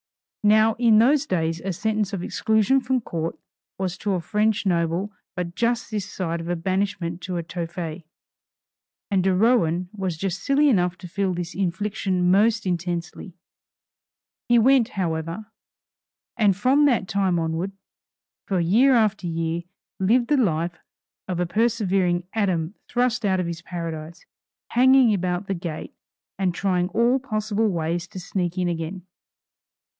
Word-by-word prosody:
Now 215 +1 +5
in 230 -3 +5
those 270 +5 +4
days 165 -2 -1
a 190 - -2
sentence 215 +2 -1
of 190 -3 -4
exclusion 220 +7 +2
from 255 0 0
Court 165 -6 -4 0.4
was 190 -1 -3
to 205 -1 -1
a 185 - 0
French 210 +5 0
noble 175 +2 0 0.2
but 175 -1 -4
just 235 +4 -1
this 205 -2 -3
side 170 -2 -3
of 165 - -6
a 175 - 0
banishment 180 -1 -2
to 185 - -5
Tophet; 170 0 -5 1.1
and 190 -2 +2
de 190 -1 +2
Rohan 185 -5 +2
was 190 -5 -3
just 195 +2 -3
silly 285 +4 +3
enough 180 -6 +2
to 180 - -9
feel 190 +1 -1
this 175 0 -4
infliction 190 -1 0
most 215 +3 +3
intensely. 175 0 -3 1.1
He 240 - +6
went 250 0 +4
however, 165 +2 -2 0.9
and 210 -5 +3
from 265 +7 +4
that 240 -9 +2
time 190 -3 +1
onward, 165 +4 -2 0.7
for 190 -4 0
year 230 +11 +4
after 215 -5 +1
year, 165 0 -2 0.3
lived 235 +6 +2
the 295 - +4
life 170 -7 0 0.5
of 180 -2 -2
a 180 - +1
persevering 190 -3 +1
Adam 185 -5 0 0.2
thrust 245 -1 0
out 190 -2 +2
of 180 - -1
his 170 -1 -5
paradise, 165 -2 -6 0.4
hanging 255 -1 +5
about 180 0 -1
the 195 - -2
gate 170 -3 -6 0.5
and 185 -3 0
trying 180 -2 0
all 235 +7 +2
possible 215 -3 -1
ways 170 0 -2
to 185 - -8
sneak 180 0 -3
in 180 -1 +1
again. 170 +2 -4
190 Hz, 150 wpm, -24 LUFS, 175-220 Hz, 1.1 s, He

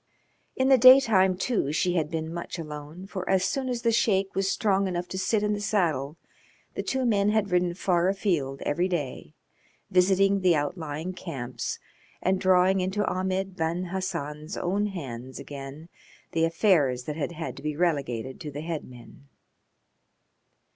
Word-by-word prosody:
In 260 +1 +2
the 265 -2 +6
daytime, 225 -8 +7
too, 190 - 0
she 180 +3 +1
had 160 -4 0
been 160 -1 -4
much 170 +1 -5
alone, 150 +2 -8
for 190 -2 -6
as 190 -1 +3
soon 265 -2 -1
as 245 -1 -3
the 230 - +3
Sheik 200 -4 +2
was 195 +1 0
strong 195 -1 +1
enough 180 -1 -3
to 190 - -5
sit 205 +3 +1
in 210 0 +1
the 205 - -3
saddle 165 -8 0 0.6
the - - -3
two 265 -1 -1
men 205 -3 +3
had 210 -2 +1
ridden 180 -1 +1
far 180 -1 +1
afield 170 -9 -1
every 175 +5 0
day, 145 - -4 0.6
visiting 195 +2 +4
the 180 -3 +4
outlying 155 +2 -3
camps 140 -10 -5 0.4
and 190 0 0
drawing 185 0 +4
into 190 +3 -1
Ahmed 190 +1 -2
Ben 175 +1 -2
Hassan's 165 -4 -4
own 200 +4 0
hands 130 - -7
again 140 +2 -8 0.4
the 165 0 +2
affairs 165 - +2
that 150 +3 -5
had 160 +2 -3
had 160 0 -5
to - - -9
be 150 0 -3
relegated 135 -8 -1
to 150 - -5
the 145 +1 -6
headmen. 140 -4 -8
180 Hz, 160 wpm, -27 LUFS, 150-195 Hz, 0.6 s, daytime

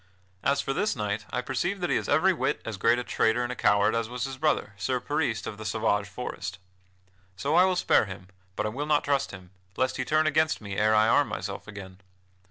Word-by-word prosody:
As 140 +5 +2
for 135 - -2
this 210 +6 0
knight, 105 -2 -3
I 125 - -1
perceive 175 +10 -2
that 175 -4 -1
he - - +3
is - - -2
every 180 +6 +4
whit - - -1
as 110 -3 -4
great 115 +4 +3
a 125 - -2
traitor 120 0 +1
and 120 - -3
a - - -4
coward 100 0 +3
as 115 -1 -1
was 125 0 -4
his 135 0 -3
brother 150 -7 0
Sir 125 +7 -1
Peris 125 -5 -1
of 105 - -6
the - - -6
Sauvage 105 -1 0
Forest. 105 -5 -6 0.8
So 140 +11 -1
I 180 +2 +6
will 185 -1 +1
spare 175 - +3
him, 95 -1 -9 0.3
but 105 - -1
I - - 0
will 140 +7 -4
not 150 -1 +3
trust 140 -1 +1
him, 95 -2 -11 0.3
lest 130 0 0
he - - -1
turn 155 +1 +2
against 155 +1 +2
me 100 -2 -6
ere 110 +1 +3
I 110 +1 +5
arm - - +4
myself - - -5
again. 95 -2 -10
120 Hz, 235 wpm, -27 LUFS, 105-145 Hz, 0.8 s, I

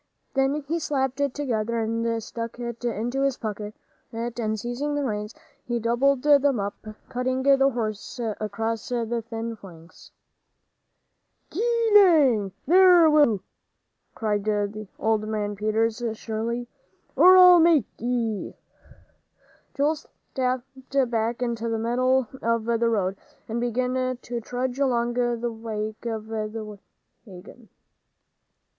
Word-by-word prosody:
Then 270 +2 +1
he 335 +3 -1
slapped 265 -3 -1
it 280 -2 0
together 235 -5 -1
and 230 0 -1
stuck 230 +1 -6
it 235 -1 -6
into 240 +3 -2
his 275 -2 +1
pocket, 210 -1 -5 0.4
and 230 -2 -3
seizing 245 +6 -3
the 290 - -1
reins, 210 -3 -3 0.3
he 240 -1 -2
doubled 250 +4 +1
them 285 -4 +4
up, 200 0 -2 0.3
cutting 255 +1 -2
the 275 0 +5
horse 220 -3 -4 0.2
across 220 +2 -3
the 235 -1 -1
thin 230 0 -5
flanks. 170 -5 -15 1.4
"Gee 460 +4 +1
lang, 290 - +5
there 355 -1 +6
will 300 -1 +6
you!" 200 -3 -4 0.7
cried 210 -1 -1 0.5
old 220 -1 0
man 210 -1 -2
Peters, 220 +3 0
shrilly, 230 +2 -4 0.5
"or 370 +1 +8
I'll 360 -1 +9
make 330 -4 +5
ye!" 230 -3 -2 1.2
Joel 295 +3 +1
stepped 260 -1 -3
back 230 +1 -1
into 235 -1 -2
the 225 - -1
middle 250 +2 +1
of 230 -1 0
the 235 0 +1
road, 195 -4 0 0.3
and 230 +1 -3
began 255 +1 -1
to 240 -1 -5
trudge 250 +3 -3
along 240 -3 +1
in 240 -1 0
the 240 0 -1
wake 220 0 -5
of 220 -2 -4
the 215 -1 -5 0.5
wagon. 195 +5 -13
235 Hz, 125 wpm, -25 LUFS, 220-265 Hz, 1.4 s, I'll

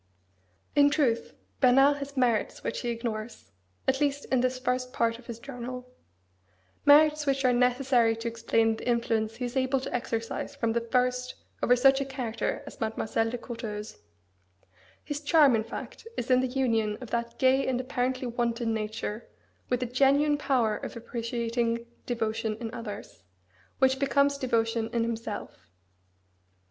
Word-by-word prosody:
In 285 0 +6
truth, 265 -6 0 0.2
Bernard 270 +3 +5
has 280 0 -7
merits 240 -4 +1
which - - -2
he 240 - -3
ignores, 230 -1 -5 0.4
at 265 +1 +2
least 285 0 0
in 260 -2 +3
this 255 0 0
first 255 0 -2
part 230 0 0
of 240 - -17
his 235 -2 -6
journal: 250 0 -7 0.9
merits 300 +1 +6
which 270 -1 +1
are 250 - +5
necessary 250 -2 +3
to 225 +1 -5
explain 225 -1 +1
the - - -8
influence 225 -2 0
he 245 +2 -3
is 245 +2 -5
able 260 0 +2
to 260 - -6
exercise 230 +3 -3
from 230 -5 0
the 235 - +1
first 250 +1 0 0.3
over 245 - +5
such 270 +2 +5
a - - -1
character 250 -4 -3
as - - -11
Mademoiselle 225 0 0
de 245 - -3
Courteheuse. 225 -3 -6 1.0
His 290 -1 -4
charm, 295 -4 +5
in 220 - 0
fact, 230 - -8
is 245 - -2
in 255 - +6
the 260 - 0
union 230 -5 0
of 250 -4 -9
that 235 0 -2
gay 265 +1 +3
and 255 -1 0
apparently 255 0 -1
wanton 235 -1 -1
nature 215 0 -4 0.4
with 250 0 +1
a - - -1
genuine 280 +4 +3
power 240 -7 +1
of - - -7
appreciating 235 0 -2 0.2
devotion 220 -2 -1
in 230 -1 -5
others, 215 -3 -7 0.6
which 265 0 +3
becomes 280 0 +2
devotion 230 -3 0
in 235 -1 +1
himself. 220 - -5
245 Hz, 155 wpm, -28 LUFS, 230-265 Hz, 1.0 s, In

